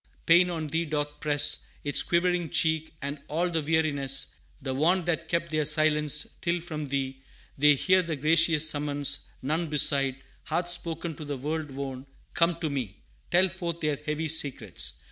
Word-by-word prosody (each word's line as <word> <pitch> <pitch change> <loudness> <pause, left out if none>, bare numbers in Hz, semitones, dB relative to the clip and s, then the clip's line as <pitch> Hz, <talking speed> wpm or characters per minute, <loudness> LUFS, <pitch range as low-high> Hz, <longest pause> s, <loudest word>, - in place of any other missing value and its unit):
Pain 175 +2 +5
on 165 -3 -3
Thee 165 +3 -1
doth 145 -1 -3
press 145 -1 +1 0.2
Its 145 - +4
quivering 175 -1 0
cheek, 160 +1 0
and 140 +1 -4
all 175 +4 -1
the 165 -1 0
weariness, 145 -4 +1 0.3
The 135 -2 -4
want 170 +6 +1
that 165 -1 -1
keep 170 0 -1
their 155 0 0
silence, 150 0 +2 0.2
till 175 0 0
from 155 -3 -6
Thee 135 -1 -3 0.3
They 145 +1 +5
hear 185 +7 +3
the 170 -3 -4
gracious 155 +1 +4
summons, 145 -1 0 0.2
none 160 +5 -1
beside 140 -3 +3 0.3
Hath 170 +3 -2
spoken 170 -1 0
to 155 - -8
the 145 -1 -4
world 150 +3 -4
worn, 135 -1 -6 0.3
'Come 170 0 +2
to 160 - -1
me,' 120 -8 -5 0.3
Tell 180 +2 +5
forth 170 -2 -5
their 150 -2 0
heavy 150 +2 -3
secrets. 140 - -1
155 Hz, 165 wpm, -27 LUFS, 145-170 Hz, 0.3 s, Pain